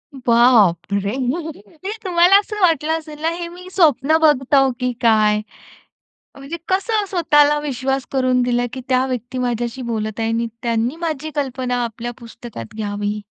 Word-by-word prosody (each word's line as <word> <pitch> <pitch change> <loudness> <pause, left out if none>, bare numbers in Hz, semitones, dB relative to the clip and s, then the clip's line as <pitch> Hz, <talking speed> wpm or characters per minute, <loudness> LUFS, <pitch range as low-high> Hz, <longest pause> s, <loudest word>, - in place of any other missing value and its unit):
बाप 235 -8 +3
रे! 200 0 0 0.7
ते 390 - -3
तुम्हाला 355 0 +4
असं 420 +1 -6
वाटलं 320 -3 +2
असेल 305 -2 -10
ना, 320 - +1
हे 340 0 -4
मी 360 +1 -12
स्वप्न 315 -3 +4
बघतो, 270 -2 +4
की 250 0 0
काय? 215 -2 +3 1.0
म्हणजे 275 +5 -7
कसं 410 +2 +1
स्वतःला 295 -5 +3
विश्वास 270 -2 -2
करून 255 -2 +2
दिला, 245 0 +1
की 260 - -5
त्या 255 0 +3
व्यक्ती 250 0 -4
माझ्याशी 240 0 -2
बोलत 215 -1 -3
आहे 225 0 0
आणि 230 +1 -1 0.2
त्यांनी 235 +3 0
माझी 310 -1 -3
कल्पना 255 -3 -2
आपल्या 235 +1 -5
पुस्तकात 230 - -10
घ्यावी. 205 -1 -3
255 Hz, 150 wpm, -19 LUFS, 230-310 Hz, 1.0 s, तुम्हाला